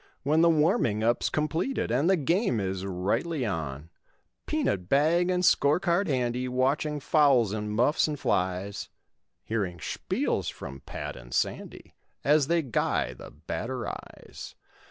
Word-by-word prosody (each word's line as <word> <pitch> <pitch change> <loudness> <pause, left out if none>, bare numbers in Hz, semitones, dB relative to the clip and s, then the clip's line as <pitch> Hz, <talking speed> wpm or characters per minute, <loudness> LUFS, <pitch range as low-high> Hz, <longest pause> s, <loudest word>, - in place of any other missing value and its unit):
When 155 +3 +3
the 170 - +6
warming 150 - +2
up's 120 +1 +2
completed 155 - -1
And 140 +8 +2
the 190 - +5
game 170 - +1
is 95 -1 -3
rightly 105 - -1
on; 80 - -4 0.6
Peanut 100 - -1
bag 165 +6 +3
and 180 0 +1
score 145 +1 +4
card 185 +2 +1
handy, 125 -2 -1
Watching 135 +4 0
fouls 135 -8 +3
and 105 -1 -3
muffs 125 +10 +2
and 150 -2 -4
flies, 95 +2 -1 0.5
Hearing 100 -6 -2
speils - - -2
from 70 +1 -9
Pat - - -5
and - - -12
Sandy - - -3 0.3
As 145 -1 +4
they 170 0 +2
guy 125 -5 0
the - - -11
batteries. 125 +1 -7
130 Hz, 135 wpm, -27 LUFS, 100-160 Hz, 0.6 s, the